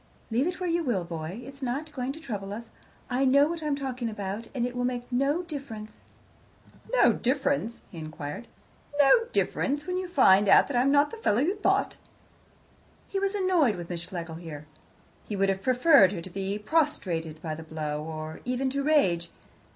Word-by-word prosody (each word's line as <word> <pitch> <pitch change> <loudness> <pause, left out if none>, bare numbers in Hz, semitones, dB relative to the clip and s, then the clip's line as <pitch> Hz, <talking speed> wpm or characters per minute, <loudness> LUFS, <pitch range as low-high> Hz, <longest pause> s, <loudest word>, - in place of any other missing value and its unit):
"Leave 250 +7 +2
it 360 +1 -3
where 365 - -2
you 340 0 +1
will, 235 - 0
boy. 170 +5 -6
It's 275 +1 -10
not 275 +5 -3
going 255 -1 -2
to 305 - -9
trouble 205 -9 -5
us: 230 +2 -8 0.4
I 255 +2 0
know 280 +2 +5
what 335 0 -4
I'm 300 -2 0
talking 255 -4 -3
about, 205 +1 -5
and 240 -2 0
it 245 0 -4
will 245 - -1
make 245 -1 -1
no 275 +7 +1
difference." 270 -10 -8 0.9
"No - - +5
difference?" 265 -2 -1
he 170 - -8
inquired. 155 +6 -6 0.5
"No 295 - +6
difference, 290 - 0
when 365 0 -2
you 370 0 -3
find 205 - +5
that 280 - +5
I 240 - +4
am 265 - +3
not 285 +1 +4
the 460 - -7
fellow 215 - +1
you 340 +7 +2
thought?" 410 - +1 1.1
He 390 - -1
was 395 +1 0
annoyed 360 - +3
with 175 0 -7
Miss 170 -1 -3
Schlegel 170 -2 -6
here. 155 -3 -8 0.6
He 210 - -3
would 195 0 +2
have 195 0 -1
preferred 250 - +5
her 175 - -4
to 185 - -8
be 195 +2 -3
prostrated 205 - -1
by 160 -2 -3
the 155 - -7
blow, 155 -2 -4
or 155 0 -6
even 255 +2 -1
to 280 +1 -1
rage. 190 - +2
245 Hz, 190 wpm, -27 LUFS, 190-290 Hz, 1.1 s, No